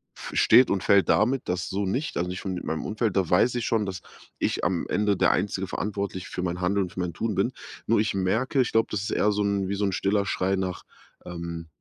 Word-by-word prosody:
f - - -8
steht 125 +3 +6
und 95 - 0
fällt 100 -1 +4
damit, 125 +2 +2
dass” 90 -1 -2
so 100 0 -1
nicht, 130 +10 -2
also, 90 +1 -1
nicht 90 +2 -6
und 95 - -2
mit 90 - -5
meinem 80 - -3
Umfeld, 110 -2 -1
da 95 - +2
weiß 115 +9 +3
ich 120 - -1
schon, 110 -3 +1
dass 95 -1 -5 0.4
ich - - -1
am 90 -1 0
Ende 105 -2 +1
der - - +4
einzige 95 -1 -1
Verantwortliche 100 -1 -4
für 90 - -4
mein 90 0 -3
Handeln 100 +2 +1
und 90 - -6
für - - -7
mein 90 -2 -2
Tun 110 +4 -2
bin. 100 +7 +1 0.4
Nur 115 0 +3
ich 110 -1 +1
merke 110 +8 +1
ich 125 - -1
glaube, 115 0 +3
das 105 -2 -1
ist 105 - -3
eher 105 - +2
so 105 - -1
'n, 100 -2 0
wie 100 - -1
so 100 +1 0
'n 95 - 0
stiller 100 +1 0
Schrei 95 -1 0
nach, 95 -1 -3 0.4
ähm: 85 -1 -6
100 Hz, 255 wpm, -26 LUFS, 90-105 Hz, 0.4 s, steht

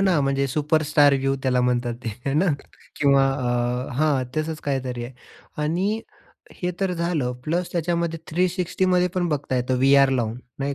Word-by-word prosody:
ना. 185 -6 +3
म्हणजे 135 0 +1
superstar 150 +1 +3
view 135 0 0
त्याला 125 -1 +2
म्हणतात 120 -1 0
ते, - - -1 0.2
हे 135 - +1
ना. 170 +6 +3 0.5
किंवा 140 -1 +4
अ, 125 -1 -1
हां. 145 -3 +2
तसंच 155 0 -2
काहीतरी 130 -4 -2
आहे. 125 - -8 0.5
आणि 190 +8 0 0.6
हे 180 - +1
तर 190 -2 +1
झालं. 170 -7 -1
प्लस 170 +3 -1
त्याच्यामध्ये 170 -1 -1
360 180 +2 0
मध्ये 180 0 +3
पण 175 -2 0
बघता 140 -3 -1
येतं 125 +1 0
व्ही-आर 135 +1 +5
लावून, 120 -3 -1 0.2
नाही 140 +1 -2
145 Hz, 160 wpm, -23 LUFS, 130-170 Hz, 0.6 s, व्ही-आर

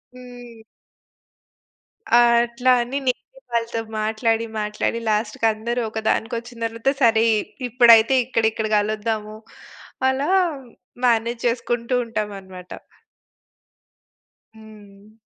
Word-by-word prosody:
హ్మ్. 245 -2 -12 1.6
ఆహ్, 240 0 +6 0.2
అట్లా 245 +2 0
అని 255 +4 -4
నేనె - - -3
వాళ్ళతో 230 0 -1 0.2
మాట్లాడి, 225 +1 0
మాట్లాడి 210 +2 -2
లాస్ట్‌కి 215 +1 -1
అందరూ 235 +3 -3
ఒకదానికి 220 +1 -1
ఒచ్చిన 235 0 -13
తరువాత 230 +4 -1
సరే, 225 -1 +4
ఇ - - +1 0.3
ఇప్పుడైతే 235 0 +6
ఇక్కడ, 230 -2 -1
ఇక్కడ 220 0 -3
కలుద్దాము. 215 0 -2 0.7
అలా 275 +5 -1 0.8
మేనేజ్ 235 0 0
చేసుకుంటూ 235 +1 -1
ఉంటాం 215 -2 -3
అన్నమాట. 185 -1 -13 1.8
హ్మ్. 210 -1 -16
230 Hz, 100 wpm, -21 LUFS, 215-240 Hz, 1.8 s, ఆహ్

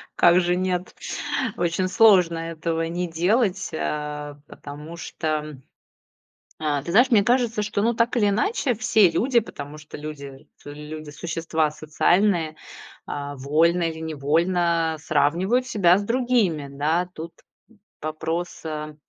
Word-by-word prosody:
как 175 +1 +5
же 175 0 +1
нет, 180 -1 -2 0.6
очень 175 +2 0
сложно 185 -5 +5
этого 165 0 -3
не 175 +2 -2
делать. 190 +4 +1
Э, 150 -1 -4
потому 150 +3 -10
что, 155 -3 -4 1.0
э, 145 -3 -1
ты 170 - -5
знаешь, 245 +7 +5
мне 220 -4 +5
кажется, 235 -1 +1
что, 205 -1 -1
ну, 235 +2 +2
так 230 +2 +1
или 210 -3 +3
иначе 245 - 0
все 220 -4 +4
люди, 235 +9 +2
потому 150 -8 -9
что 155 0 -10
люди 140 -2 -9 0.2
люди 150 +1 -8
существа 160 0 -1
социальные, 160 +2 +1 0.5
а, 145 0 -5
вольно 160 +6 +2
или 160 -1 -3
невольно 165 +2 +1
сравнивают 170 - +1
себя 185 -6 +4
с - - -3
другими, 230 - +1
да. 155 +6 0
Тут 165 +2 -7 0.7
вопрос, 160 +3 -4
э, 155 -1 -5
165 Hz, 130 wpm, -23 LUFS, 155-195 Hz, 1.0 s, как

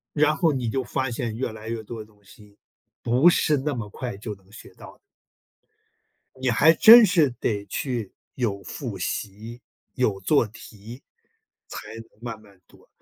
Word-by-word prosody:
然 150 +1 +3
后 165 -1 +2
你 130 -4 -2
就 130 +3 -1
发 130 +2 -2
现 115 -2 -4
越 120 0 -3
来 110 0 -9
越 115 -1 -4
多 115 +1 -8
的 105 - -8
东 105 -1 -27
西， 100 +1 -19 0.4
不 125 +8 +4
是 155 -3 +2
那 145 +2 -2
么 115 -5 -5
快 120 0 -6
就 105 +1 -6
能 95 0 -25
学 110 - -14
到 - - -13
的。 - - -43 1.4
你 130 -1 0
还 145 +8 +5
真 225 +6 +9
是 170 -6 +3
得 105 -4 -3
去 115 -1 -4 0.2
有 105 -6 -2
复 120 -8 -6
习、 110 +6 -5 0.3
有 110 -6 0
做 120 +3 +2
题， 110 +3 -13 0.6
才 - - -9
能 115 0 -9 0.2
慢 115 -3 -7
慢 100 -3 -21
读， - - -22
115 Hz, 185 characters per minute, -24 LUFS, 105-130 Hz, 1.4 s, 真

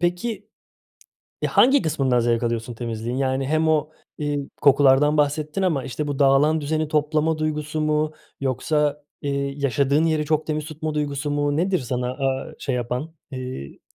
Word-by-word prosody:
peki 195 +4 -2 1.0
hangi 270 -2 +5
kısmından 135 -6 +1
zevk 115 0 +1
alıyorsun 115 0 -2
temizliğin? 115 +1 -4
Yani 135 0 0
hem 155 +1 +2
o, 155 -1 +2 0.3
iii, 145 -2 -2
kokulardan 140 +1 +5
bahsettin 150 +4 0
ama 150 -9 +1
işte 145 +4 -4
bu 140 - -3
dağılan 145 +3 +4
düzeni 155 +1 -1
toplama 155 +1 +1
duygusu 155 0 -2
mu 155 0 +1 0.3
yoksa, 145 +3 0 0.2
ııı, 140 -1 0
yaşadığın 140 +1 +1
yeri 155 -2 +1
çok 155 0 0
temiz 155 -1 -2
tutma 155 0 -5
duygusu 145 -1 -2
mu? 145 0 0
Nedir 185 +2 +1
sana, 125 0 -2
aaa, 135 +3 -2
şey 135 -3 -2
yapan 125 +7 -3 0.2
ııı? 130 - -7
145 Hz, 150 wpm, -23 LUFS, 135-155 Hz, 1.0 s, hangi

